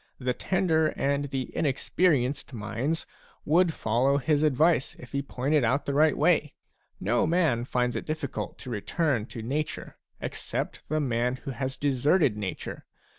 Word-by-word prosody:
The 125 -1 -1
tender 165 -1 +2
and 140 +1 +1
the 135 -2 -4
inexperienced 140 -2 +1
minds 120 +8 -2 0.4
would 170 +3 +4
follow 130 +2 +1
his 145 +1 +1
advice 155 0 +3
if 125 - -12
he 140 - -1
pointed 140 +1 0
out 130 +5 +1
the 140 - -1
right 155 +1 +4
way. - - +2 0.4
No 115 +9 +1
man 160 -9 +2
finds 125 -1 0
it - - -4
difficult 155 -2 -4
to 125 - -7
return 120 +2 0
to' 115 -3 -7
nature, 145 +5 -3 0.2
except - - -4
the 155 +1 +1
man 125 -2 0
who 135 - -3
has 130 +1 -3
deserted 140 - +2
nature. 100 -3 -5
140 Hz, 150 wpm, -27 LUFS, 125-155 Hz, 0.4 s, would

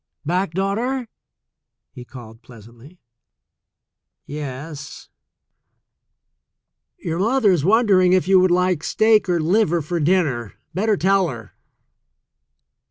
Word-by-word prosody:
"Back, 180 +1 -1
daughter?" 230 +7 -2 0.8
he 125 - -11
called 120 -3 -13
pleasantly. 120 - -17 1.3
"Yes." 145 +1 -8 1.9
"Your 165 0 -4
mother 225 +1 +2
is 170 -6 0
wondering 195 -2 +3
if 185 -1 +2
you 190 -1 +5
would 185 0 +3
like 180 -2 +1
steak 215 -3 +2
or 175 -1 +1
liver 175 +1 +1
for 170 +3 -4
dinner. 145 - 0 0.2
Better 210 +3 0
tell 195 +1 +2
her." 115 - -9
180 Hz, 100 wpm, -20 LUFS, 145-195 Hz, 1.9 s, you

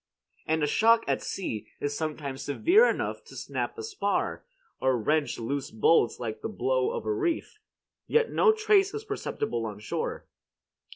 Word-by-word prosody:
And 160 0 +1
a - - +5
shock 225 +9 +4
at - - 0
sea 115 - -4
is 145 0 -2
sometimes 150 -4 -4
severe 360 - +4
enough - - -2
to - - -13
snap - - -4
a 440 - -5
spar, 430 -2 -1 0.4
or 130 -1 +2
wrench 140 +1 0
loose 135 +4 -3
bolts 115 +2 +3
like 115 -3 -4
the - - -3
blow 425 - 0
of 475 0 -4
a 425 - +1
reef, 395 +2 -2 0.5
yet 460 0 +2
no 445 - +5
trace 425 -2 +3
is 430 - -4
perceptible 400 - -3
on 105 -2 -5
shore. 105 - -4
185 Hz, 165 wpm, -28 LUFS, -, 0.5 s, a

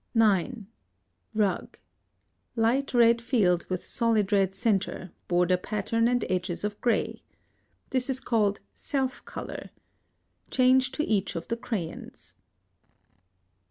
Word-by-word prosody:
9. 220 +1 +2 0.7
Rug. 200 -4 0 0.8
Light 235 +5 +2
red 235 -1 +5
field 190 -8 +2
with 185 -1 -3
solid 225 -4 +1
red 195 -2 +2
centre, 195 -4 0 0.2
border 180 +1 +3
pattern 215 +4 0
and 245 -1 +1
edges 180 -1 -2
of 210 0 -3
gray. 235 -2 0 0.7
This 255 0 +1
is 260 -1 +1
called 210 -6 +1
self 265 -2 -2
color. - - -7 0.8
Change 260 0 +4
to 305 - -1
each 200 -5 0
of 165 - -5
the 230 - +1
crayons. 200 -8 -5
220 Hz, 115 wpm, -27 LUFS, 190-245 Hz, 0.8 s, red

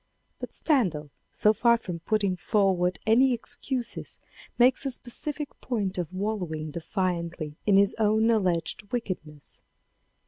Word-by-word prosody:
But - - -6
Stendhal 175 - +1 0.2
so 215 - +3
far 235 +1 +4
from 180 -6 -6
putting 200 +1 0
forward 180 -2 +1
any 250 +4 +5
excuses 245 +1 -4 0.4
makes 250 +2 +4
a 275 - -1
specific 285 +4 -3
point 200 -7 -2
of 175 -1 -3
wallowing 185 -6 -3
defiantly 170 -2 -3
in 200 -2 +6
his 200 0 +5
own 220 +1 +3
alleged 185 -1 0
wickedness. 170 - -5
200 Hz, 125 wpm, -27 LUFS, 175-230 Hz, 0.4 s, in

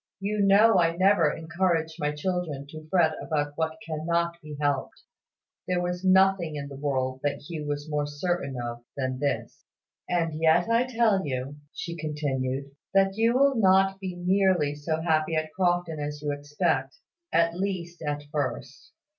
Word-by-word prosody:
You 205 +2 -2
know 200 +1 +6
I 165 0 +2
never 185 -5 +4
encourage 165 -1 -1
my 150 -1 0
children 150 -2 -3
to 155 0 -10
fret 170 -3 +4
about 145 -2 -1
what 160 0 -2
cannot 170 +2 -1
be 150 -1 -8
helped." 145 -2 -1 0.6
There 180 -1 +1
was 180 +1 -2
nothing 190 -3 +4
in 140 -1 -5
the 140 - -8
world 130 -2 -1
that 145 0 -2
Hugh 150 -1 -6
was 145 +1 -3
more 150 -1 -1
certain 145 -2 -2
of 120 0 -5
than 130 -1 -2
this. 140 0 -2 0.5
"And 165 -3 0
yet 165 +3 +4
I 230 +2 +3
tell 225 -6 +2
you," 135 0 -4
she 170 - -5
continued, 140 -4 -2 0.2
"that 195 0 +4
you 230 +2 +2
will 275 +1 +5
not 195 -3 +4
be 185 -2 -5
nearly 180 -4 +2
so 155 +2 -2
happy 160 -1 +1
at 155 0 -2
Crofton 175 -3 0
as 150 0 -4
you 145 - 0
expect 145 -1 -1 0.3
at 170 0 +3
least, 175 -3 -3
at 145 -1 -3
first. 140 -2 -4
160 Hz, 165 wpm, -27 LUFS, 145-185 Hz, 0.6 s, know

